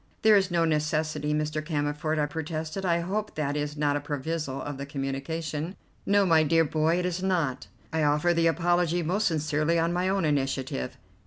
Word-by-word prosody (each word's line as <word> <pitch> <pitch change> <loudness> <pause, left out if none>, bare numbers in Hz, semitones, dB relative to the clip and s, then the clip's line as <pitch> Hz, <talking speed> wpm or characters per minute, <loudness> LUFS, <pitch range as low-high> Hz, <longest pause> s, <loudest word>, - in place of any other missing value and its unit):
"There 215 -1 +7
is 195 -2 +3
no 170 -1 +2
necessity, 155 -1 0
Mr. 155 0 -1
Cammerford," 150 0 -1
I 150 - +2
protested, 160 +4 -4
"I 170 -2 +2
hope 205 +5 -3
that 145 -2 -1
is 150 0 -3
not 145 -1 +1
a - - +1
proviso 145 0 -3
in 145 -2 -5
the 140 - -5
communication?" 150 +5 -3 0.3
"No, 200 0 +4
my 165 -3 +5
dear 165 +2 +3
boy, 155 +3 +1
it 180 - -1
is 180 0 -2
not. 170 -9 0 0.3
I 160 - +1
offer 150 +3 +3
the 165 0 +3
apology 175 +1 +2
most 190 +7 +1
sincerely 155 0 +1
on 165 +1 +1
my 180 +1 +1
own 195 -3 +1
initiative. 135 - -1
155 Hz, 185 wpm, -27 LUFS, 150-170 Hz, 0.3 s, There